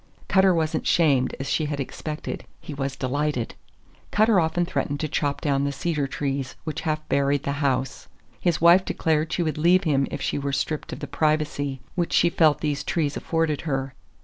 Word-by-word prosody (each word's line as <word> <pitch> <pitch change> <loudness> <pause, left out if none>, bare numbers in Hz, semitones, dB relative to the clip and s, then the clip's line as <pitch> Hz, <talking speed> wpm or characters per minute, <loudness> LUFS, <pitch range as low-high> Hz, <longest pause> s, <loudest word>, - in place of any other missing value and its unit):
Cutter 190 0 +5
was 160 -3 0
n't - - -2
shamed 140 -7 +3
as 135 - -4
she 155 - +1
had 145 -1 -3
expected; 150 +3 -5
he 150 - -8
was 135 -1 -3
delighted! 140 -2 -1 0.6
Cutter 215 -2 +4
often 165 +1 +1
threatened 145 -4 -2
to 155 - 0
chop 145 -1 -1
down 140 -2 +1
the 140 - 0
cedar 145 0 -1
trees 135 -1 -3
which 155 -2 -4
half 155 -1 -2
buried 140 0 +1
the 140 - -1
house. 135 -2 -1 0.3
His 175 -3 +1
wife 170 +3 +6
declared 155 -3 0
she 175 - 0
would 155 -2 -2
leave 175 +4 +4
him 140 -4 +2
if 145 - -5
she - - -1
were 140 0 -2
stripped 155 +2 -2
of 145 - -7
the - - -3
"privacy" 145 -2 0
which 175 -2 -1
she 170 - +4
felt 155 -3 +3
these 145 -2 -1
trees 150 -4 -1
afforded 160 -3 -1
her. 135 -4 -2
150 Hz, 195 wpm, -24 LUFS, 140-160 Hz, 0.6 s, wife